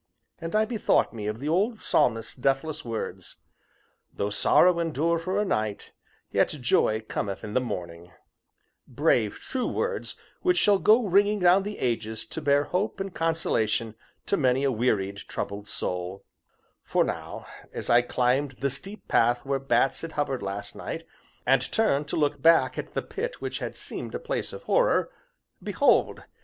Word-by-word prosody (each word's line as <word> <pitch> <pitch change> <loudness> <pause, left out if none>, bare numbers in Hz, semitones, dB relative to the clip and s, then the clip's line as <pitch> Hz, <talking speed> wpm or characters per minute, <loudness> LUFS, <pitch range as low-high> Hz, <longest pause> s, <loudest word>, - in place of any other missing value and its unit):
And 165 +4 -4
I 215 0 +4
bethought 220 - +1
me 105 -2 -5
of 105 +1 -2
the 140 +5 -5
old 205 +8 0
Psalmist's 115 -2 +1
deathless 135 +4 -1
words: 115 -2 -5 0.8
"Though 100 +1 -3
sorrow 175 - +4
endure 165 +1 0
for 185 +4 -1
a 210 - +1
night, 110 - -2 0.4
yet - - +3
joy 125 -5 +1
cometh 100 -2 -4
in 105 - -6
the 130 - +2
morning" 85 -7 -6 0.8
(brave, 110 -4 +1
true 255 -2 -2
words 475 0 -1 0.3
which 360 -1 +2
shall 205 - +5
go 220 +4 +5
ringing 205 +2 +3
down 180 0 +5
the 205 +1 -5
ages 110 -3 -2
to - - -4
bear 145 0 +3
hope 195 +7 -2
and 195 -1 -4
consolation 115 -10 0 0.3
to 200 - +1
many 130 -1 +2
a 140 - +2
wearied, 105 -5 0
troubled 100 +1 -5
soul); 90 0 -3 0.6
for - - +2
now, - - -5 0.3
as - - -5
I 120 +1 +6
climbed 125 +3 0
the 135 +2 -2
steep 195 +9 -7
path 120 +2 +2
where 135 0 0
bats 135 0 +1
had 165 -1 -6
hovered 140 -3 -1
last 100 +1 -5
night, - - -6 0.4
and 130 0 +4
turned 150 -10 +2
to - - -1
look 145 -2 0
back 165 0 +5
at - - -7
the - - -1
pit 475 +4 -5
which - - -4
had - - -5
seemed - - -6
a - - -2
place - - -3
of - - -9
horror - - +2 0.5
behold! - - +2
140 Hz, 165 wpm, -26 LUFS, -, 0.8 s, I